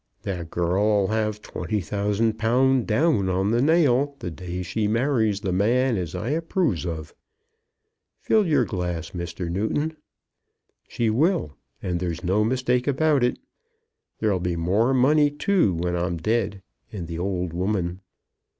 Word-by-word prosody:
"That 90 -4 -4
girl 100 +5 +2
'll 95 - -2
have 110 -1 -1
twenty 105 -1 -3
thousand 105 +4 -1
pound, 125 +3 +2
down 110 - +2
on 95 +3 +1
the 120 +1 +2
nail, 145 -2 +3
the 90 - -5
day 90 +1 -5
she 105 +5 -1
marries 110 -3 +1
the 95 -3 -2
man 120 +7 +2
as 90 -6 -3
I 115 - -3
approves 160 - 0
of. 80 -3 -5 1.1
Fill 215 -3 +2
your 145 -6 +3
glass, 90 -5 -3
Mr. 85 0 -5
Newton. 110 - -1 0.9
She 115 -2 0
will; 140 - +1 0.3
and 90 -2 -1
there's 85 -1 -3
no 95 +4 +2
mistake 125 +2 0
about 145 -1 +2
it. 125 - +1 0.8
There'll 105 -4 +1
be 90 -1 -1
more 95 +9 +1
money 145 +3 +4
too, 150 - +1
when 90 +1 -1
I'm 85 0 -1
dead, 100 +1 -1 0.3
and 90 -5 -5
the 85 0 -5
old 90 -2 -2
woman." 90 -1 -1
105 Hz, 150 wpm, -24 LUFS, 90-125 Hz, 1.1 s, money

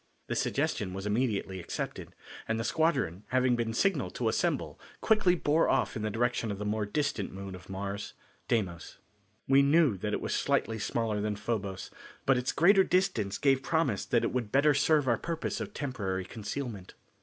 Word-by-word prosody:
This - - -2
suggestion 90 - -1
was 95 +1 -5
immediately 105 -4 -1
accepted, 85 - -5 0.3
and 110 0 0
the - - -1
squadron 135 - 0
having 130 -1 +2
been 115 -1 -1
signalled 195 +12 0
to - - 0
assemble - - -1 0.2
quickly 210 -5 +3
bore 160 -1 +2
off - - +1
in 110 - -3
the 110 - -1
direction 120 +1 0
of 100 - -3
the 105 - -5
more 105 0 -1
distant 115 -3 -1
moon 95 0 -7
of 90 +1 -11
Mars, 100 +1 -5 0.3
Deimos. 90 -8 -2 0.5
We 135 +1 +6
knew 140 - +4
that 105 +3 -3
it - - 0
was - - -3
slightly 115 -1 0
smaller 110 0 -1
than 105 0 -1
Phobos 100 -3 -4 0.3
but 135 - +4
its 125 +1 0
greater 190 +3 +5
distance 180 - +1
gave 135 -2 +3
promise 140 - 0
that 120 - +1
it - - 0
would 120 -5 -2
better 145 +2 +4
serve 145 0 +3
our 120 -2 +2
purpose 165 -1 -3
of - - -5
temporary 100 - -3
concealment. 110 -2 -6
115 Hz, 180 wpm, -30 LUFS, 100-140 Hz, 0.5 s, We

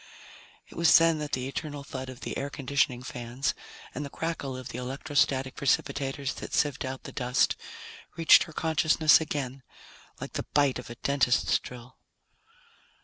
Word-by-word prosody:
It - - -15
was 170 0 +6
then 165 -1 +3
that 150 0 -5
the 130 0 -1
eternal 145 0 -5
thud 130 -1 -6
of 130 -1 -10
the - - -5
air 140 - -3
conditioning 135 -3 0
fans 125 +5 -3 0.4
and 150 - -4
the 140 - -6
crackle 145 -5 -4
of 130 - -8
the 125 - -6
electrostatic 135 0 0
precipitators 135 0 0
that - - -7
sieved 145 -3 +1
out 130 0 -5
the - - -8
dust 125 +2 +1 0.6
reached 165 -1 +7
her 165 - -12
consciousness 160 0 +4
again 135 -4 -4 0.6
like - - -7
the - - -4
bite 145 -3 +3
of 125 - -9
a 120 - -7
dentist's 135 0 +2
drill. 125 +1 -12
140 Hz, 160 wpm, -28 LUFS, 130-150 Hz, 0.6 s, reached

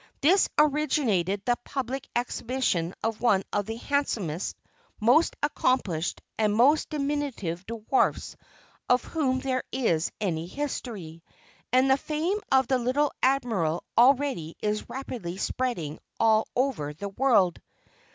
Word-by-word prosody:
Thus 355 +7 +4
originated 265 - +2
the 245 -1 +1
public 270 0 -4
exhibition 240 -7 -1
of 225 -1 -2
one 200 -6 +3
of 205 0 0
the 225 - -3
handsomest, 225 - -2 0.4
most 245 +10 +4
accomplished, 205 - 0 0.2
and 210 -1 +2
most 280 +7 +4
diminutive 280 - -2
dwarfs 230 +3 0 0.5
of 250 0 +4
whom 260 -5 -1
there 260 -1 -1
is 180 -11 0
any 170 -5 -2
history, 205 - -5 0.5
and 255 +2 +4
the 265 0 +4
fame 315 +8 -1
of 265 0 +5
the 260 -2 +2
little 265 +4 +1
Admiral 225 - +1
already 250 - +3
is 210 0 -2
rapidly 235 -9 -5
spreading 195 - -2 0.2
all 220 -1 +4
over 230 - -1
the 200 +6 -5
world. 200 -6 +2
245 Hz, 120 wpm, -27 LUFS, 195-275 Hz, 0.5 s, of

